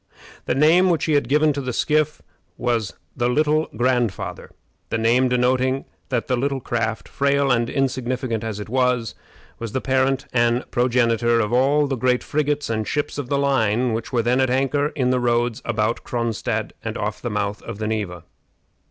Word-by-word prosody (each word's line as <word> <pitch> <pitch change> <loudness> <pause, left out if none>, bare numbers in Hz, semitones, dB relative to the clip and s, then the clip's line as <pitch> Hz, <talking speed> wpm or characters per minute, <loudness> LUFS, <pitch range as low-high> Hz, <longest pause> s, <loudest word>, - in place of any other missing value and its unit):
The - - +1
name 165 +6 +5
which 170 -3 +1
he 155 - +1
had 140 -4 +1
given 150 +1 +3
to 140 - -3
the 130 -1 -3
skiff 155 +3 0 0.3
was 115 -4 -1 0.2
The 120 -1 0
Little 155 +3 +2
Grandfather, 120 -4 -1 0.4
the - - 0
name 120 +3 +3
denoting 130 +2 +1 0.2
that 125 -3 -1
the 130 - 0
little 135 +2 -1
craft, 115 -2 -2
frail 140 0 +1
and 120 -1 +1
insignificant 130 -3 -1
as 110 -2 -4
it 105 - -6
was, 125 -1 +1 0.5
was 115 -2 -5
the - - 0
parent 130 +1 +1
and 120 0 +2
progenitor 120 -1 +2
of 105 0 0
all 140 +4 +3
the 135 -1 -1
great 125 +1 +1
frigates 150 -1 -1
and 110 -2 -2
ships 145 -1 -2
of 130 -3 -5
the 140 - +1
line 125 -4 +1
which 110 0 -4
were 120 -3 +1
then 125 +3 +2
at 130 - +2
anchor 135 +3 +1
in 130 -3 +1
the 130 - +2
Roads 120 -1 0
about 115 0 -1
Cronstadt 115 -3 -2
and - - -4
off - - -3
the - - -3
mouth 100 +1 -2
of 115 -3 -7
the 110 - -3
Neva. 100 -6 -3
125 Hz, 185 wpm, -22 LUFS, 115-135 Hz, 0.5 s, name